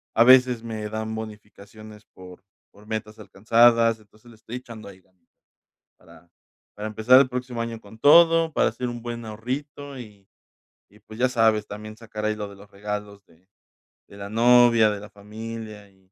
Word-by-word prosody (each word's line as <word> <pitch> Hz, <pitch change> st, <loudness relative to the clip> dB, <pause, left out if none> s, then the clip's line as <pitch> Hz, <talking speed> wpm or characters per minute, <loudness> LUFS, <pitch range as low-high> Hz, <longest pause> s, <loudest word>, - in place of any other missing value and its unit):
a 115 Hz, -, +6 dB
veces 125 Hz, -2 st, +5 dB
me 110 Hz, -2 st, -6 dB
dan 110 Hz, 0 st, -5 dB
bonificaciones, 105 Hz, 0 st, -11 dB
por 90 Hz, 0 st, -14 dB, 0.3 s
por 105 Hz, +1 st, -20 dB
metas 110 Hz, -1 st, -5 dB
alcanzadas, 115 Hz, +3 st, +3 dB
entonces 110 Hz, +2 st, -22 dB
le -, -, -16 dB
estoy 110 Hz, +3 st, -9 dB
echando 115 Hz, -4 st, -11 dB
ahí 95 Hz, -1 st, -16 dB
ganas 90 Hz, -2 st, -38 dB, 0.7 s
para 85 Hz, +1 st, -20 dB, 0.5 s
para 105 Hz, +1 st, -5 dB
empezar 110 Hz, +4 st, +5 dB
el 130 Hz, -, -1 dB
próximo 125 Hz, -1 st, -5 dB
año 115 Hz, -1 st, -5 dB
con 110 Hz, +2 st, -16 dB
todo, 165 Hz, +3 st, +5 dB
para -, -, +2 dB
hacer 125 Hz, -, -5 dB
un 120 Hz, -1 st, -7 dB
buen 120 Hz, -1 st, -7 dB
ahorrito 135 Hz, +6 st, -6 dB
y 105 Hz, -5 st, -13 dB, 0.6 s
y, 105 Hz, -, -22 dB
pues, 110 Hz, +1 st, -13 dB
ya 130 Hz, -, +3 dB
sabes, 110 Hz, -3 st, +1 dB
también 110 Hz, +1 st, -9 dB
sacar 110 Hz, -2 st, -8 dB
ahí 110 Hz, 0 st, 0 dB
lo 105 Hz, -1 st, -6 dB
de 100 Hz, -, -13 dB
los 100 Hz, +1 st, -17 dB
regalos 105 Hz, 0 st, -7 dB
de 90 Hz, +2 st, -28 dB, 0.6 s
de 100 Hz, -, -15 dB
la 100 Hz, 0 st, -8 dB
novia, 115 Hz, -1 st, +5 dB
de 105 Hz, -, -5 dB
la 105 Hz, 0 st, -12 dB
familia 105 Hz, 0 st, -10 dB
y 95 Hz, -1 st, -31 dB
110 Hz, 180 wpm, -24 LUFS, 105-120 Hz, 0.7 s, a